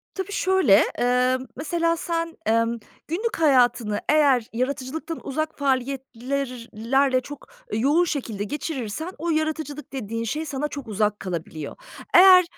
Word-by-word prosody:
Tabii, 385 Hz, +1 st, -4 dB
şöyle, 375 Hz, -, +4 dB, 0.2 s
emm, 250 Hz, +1 st, +2 dB
mesela, 335 Hz, +3 st, 0 dB
sen, 330 Hz, 0 st, -3 dB
emm, 230 Hz, +1 st, +2 dB, 0.3 s
günlük 435 Hz, +9 st, -2 dB
hayatını 245 Hz, -7 st, +3 dB
eğer 280 Hz, -6 st, +4 dB
yaratıcılıktan 275 Hz, +6 st, -3 dB
uzak 310 Hz, +3 st, -3 dB
faaliyetler 265 Hz, -1 st, -2 dB, 0.2 s
lerle 260 Hz, +4 st, +2 dB
çok 285 Hz, +2 st, -10 dB, 0.3 s
yoğun 285 Hz, +11 st, +3 dB
şekilde 230 Hz, -, -3 dB
geçirirsen 295 Hz, -, -4 dB
o 335 Hz, +2 st, -2 dB
yaratıcılık 310 Hz, -2 st, -2 dB
dediğin 230 Hz, -3 st, -4 dB
şey 305 Hz, +7 st, -3 dB
sana 290 Hz, +1 st, -2 dB
çok 280 Hz, -6 st, -7 dB
uzak 210 Hz, 0 st, 0 dB
kalabiliyor. 165 Hz, -4 st, -5 dB, 0.4 s
Eğer, 365 Hz, 0 st, +9 dB
275 Hz, 125 wpm, -24 LUFS, 240-315 Hz, 0.4 s, Eğer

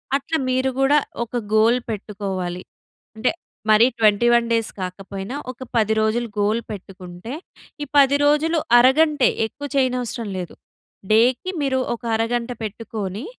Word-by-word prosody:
అట్లా 285 Hz, +3 st, -1 dB
మీరు 260 Hz, +1 st, +1 dB
గూడా 280 Hz, +2 st, +4 dB, 0.3 s
ఒక 240 Hz, +1 st, -5 dB, 0.2 s
గోల్ 225 Hz, +3 st, +4 dB
పెట్టుకోవాలి. 195 Hz, -4 st, -4 dB, 0.5 s
అంటే 220 Hz, +3 st, +1 dB, 0.4 s
మరీ 215 Hz, +3 st, +6 dB
21 235 Hz, +2 st, +4 dB
డేస్ 230 Hz, -1 st, +1 dB
కాకపోయినా, 195 Hz, +5 st, -6 dB, 0.2 s
ఒక 255 Hz, -, -19 dB, 0.2 s
10 220 Hz, -1 st, +3 dB
రోజులు 225 Hz, +2 st, 0 dB
గోల్ 215 Hz, +3 st, +1 dB
పెట్టుకుంటే 185 Hz, +2 st, -9 dB, 0.5 s
ఈ -, -, -4 dB
10 280 Hz, 0 st, +6 dB
రోజులు 310 Hz, +3 st, +3 dB, 0.2 s
అరగంటే, 280 Hz, +3 st, +4 dB, 0.2 s
ఎక్కువ 285 Hz, +5 st, -7 dB
చేయనవసరం 250 Hz, -4 st, 0 dB
లేదు. 180 Hz, -2 st, -6 dB, 0.6 s
డే‌కి 245 Hz, +10 st, +3 dB
మీరు 265 Hz, -2 st, +1 dB, 0.2 s
ఒక 235 Hz, -, -18 dB
అరగంట 235 Hz, +2 st, -1 dB
పెట్టుకొని, 215 Hz, -, -5 dB
230 Hz, 125 wpm, -21 LUFS, 210-260 Hz, 0.6 s, మరీ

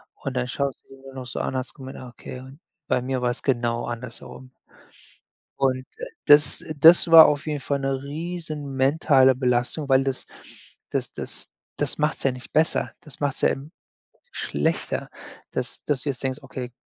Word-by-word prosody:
Und 135 Hz, -2 st, -6 dB
dann 125 Hz, 0 st, 0 dB
schaust 140 Hz, +1 st, -3 dB, 0.3 s
nur 130 Hz, -1 st, -7 dB
so 125 Hz, -, -5 dB
an, 130 Hz, -, -3 dB
hast 130 Hz, 0 st, -4 dB
gemeint: 135 Hz, -2 st, -9 dB
„Ah 130 Hz, -, -9 dB
okay, 125 Hz, +1 st, -9 dB, 0.5 s
bei 125 Hz, -, +1 dB
mir 130 Hz, 0 st, -2 dB
war's 120 Hz, -1 st, -1 dB
genau 120 Hz, -3 st, 0 dB
anders 120 Hz, 0 st, -6 dB
herum.“ 130 Hz, 0 st, -12 dB, 1.1 s
Und 130 Hz, -1 st, +1 dB, 0.4 s
das 145 Hz, 0 st, +5 dB, 0.2 s
das 165 Hz, +4 st, +8 dB
war 165 Hz, -1 st, +11 dB
auf 150 Hz, +1 st, -1 dB
jeden 150 Hz, -1 st, -1 dB
Fall 140 Hz, +1 st, -1 dB
'ne 135 Hz, 0 st, -2 dB
riesen 155 Hz, -2 st, -5 dB
mentale 135 Hz, -1 st, +4 dB
Belastung, 125 Hz, +3 st, 0 dB
weil 135 Hz, 0 st, +5 dB
das 135 Hz, -1 st, -3 dB, 0.6 s
das -, -, -2 dB
das -, -, -8 dB, 0.3 s
das -, -, -2 dB
macht's 150 Hz, +1 st, 0 dB
ja 135 Hz, -, +3 dB
nicht 125 Hz, 0 st, -11 dB
besser. 155 Hz, +1 st, +2 dB
Das 150 Hz, -5 st, -13 dB
macht's 145 Hz, -2 st, -1 dB
ja -, -, +5 dB
im 140 Hz, +3 st, -5 dB, 0.4 s
Prinzip 485 Hz, -, -34 dB
schlechter, -, -, -1 dB, 0.4 s
dass -, -, -5 dB
dass 140 Hz, -4 st, 0 dB
du -, -, -3 dB
jetzt 130 Hz, -, -6 dB
denkst: 135 Hz, 0 st, -2 dB
„Okay, 130 Hz, -2 st, -7 dB
135 Hz, 170 wpm, -24 LUFS, 130-145 Hz, 1.1 s, war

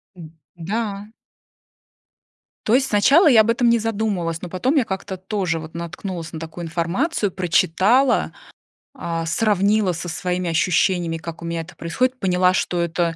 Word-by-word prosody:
М, 165 Hz, -3 st, -11 dB, 0.3 s
да. 200 Hz, +3 st, -4 dB, 1.6 s
То 220 Hz, -, +3 dB
есть 265 Hz, +1 st, +2 dB
сначала 275 Hz, -, +5 dB
я 240 Hz, -7 st, +7 dB
об 220 Hz, -, 0 dB
этом 240 Hz, +1 st, +3 dB
не 235 Hz, 0 st, +3 dB
задумывалась, 200 Hz, -7 st, -2 dB
но 180 Hz, -, -6 dB
потом 250 Hz, -, 0 dB
я 280 Hz, -, +4 dB
как-то 190 Hz, -1 st, -5 dB
тоже 185 Hz, -3 st, -2 dB
вот 155 Hz, 0 st, -10 dB
наткнулась 170 Hz, 0 st, -6 dB
на 160 Hz, -, -5 dB
такую 165 Hz, +2 st, -7 dB
информацию, 185 Hz, -, -1 dB
прочитала, 190 Hz, -, +2 dB, 0.6 s
а, 165 Hz, -11 st, -4 dB
сравнила 205 Hz, 0 st, +1 dB
со 175 Hz, +1 st, -6 dB
своими 180 Hz, +2 st, -2 dB
ощущениями, 170 Hz, 0 st, +1 dB
как 165 Hz, 0 st, -8 dB
у -, -, -7 dB
меня 170 Hz, 0 st, -3 dB
это 165 Hz, +3 st, -12 dB
происходит, 255 Hz, +10 st, -1 dB
поняла, 180 Hz, -2 st, +2 dB
что 180 Hz, -1 st, -1 dB
это, 170 Hz, 0 st, -1 dB
185 Hz, 155 wpm, -21 LUFS, 170-220 Hz, 1.6 s, я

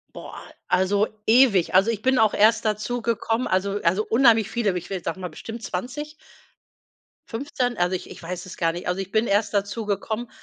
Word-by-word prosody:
Boah, -, -, -9 dB, 0.3 s
also 200 Hz, +3 st, +2 dB, 0.2 s
ewig. 220 Hz, -8 st, +4 dB
Also 195 Hz, +5 st, +5 dB
ich 215 Hz, -2 st, -2 dB
bin 260 Hz, -1 st, +3 dB
auch 220 Hz, -2 st, +3 dB
erst 220 Hz, +2 st, +4 dB
dazugekommen 225 Hz, +2 st, -1 dB
also 195 Hz, +2 st, 0 dB
also 185 Hz, +5 st, +2 dB
unheimlich 225 Hz, -3 st, +4 dB
viele, 235 Hz, -3 st, 0 dB
aber 180 Hz, -, -1 dB
ich 180 Hz, -, -8 dB
will 185 Hz, -3 st, -4 dB
sage 165 Hz, +3 st, -4 dB
mal 180 Hz, -1 st, -5 dB
bestimmt 225 Hz, +8 st, -8 dB
20 265 Hz, +12 st, -5 dB, 1.2 s
15, 245 Hz, -1 st, -2 dB
also 175 Hz, +1 st, +1 dB
ich 180 Hz, -, -7 dB
ich -, -, -11 dB
weiß 175 Hz, +2 st, -6 dB
es 185 Hz, -, -10 dB
gar 165 Hz, -1 st, +1 dB
nicht. 175 Hz, -, -6 dB
Also 180 Hz, +1 st, -1 dB
ich 195 Hz, 0 st, -8 dB
bin 220 Hz, +1 st, +1 dB
erst 205 Hz, +1 st, +1 dB
dazugekommen, 210 Hz, +2 st, -2 dB
210 Hz, 190 wpm, -24 LUFS, 185-230 Hz, 1.2 s, Also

